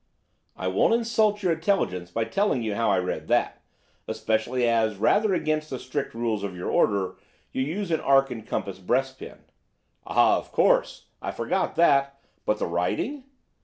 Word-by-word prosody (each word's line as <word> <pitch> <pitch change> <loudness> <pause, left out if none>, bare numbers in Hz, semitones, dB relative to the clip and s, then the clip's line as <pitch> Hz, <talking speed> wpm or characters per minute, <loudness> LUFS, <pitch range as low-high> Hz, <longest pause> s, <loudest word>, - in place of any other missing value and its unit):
"I 95 - -4
won't 95 - +3
insult 220 -3 +1
your 180 - +2
intelligence 160 - -1
by 115 +6 -1
telling 125 - 0
you 110 -2 -2
how 115 +2 +1
I - - +3
read 90 0 -3
that, - - +1 0.5
especially 110 +3 0
as, 110 -3 +1
rather 205 - +3
against 155 -2 -1
the 130 - -4
strict 130 -2 -4
rules 115 -3 -1
of 100 -2 -5
your 90 - -3
order, 100 -3 +1 0.3
you - - -2
use 170 +7 -3
an 160 - +2
arc 135 -1 +3
and 115 -3 -6
compass 100 -3 -4
breastpin." 130 +7 -2 0.6
"Ah, - - +4
of - - -13
course, - - +2 0.2
I - - -4
forgot - - -1
that. 140 -4 +3 0.3
But 105 - +1
the - - -2
writing?" 225 - -2
125 Hz, 165 wpm, -25 LUFS, 105-160 Hz, 0.6 s, Ah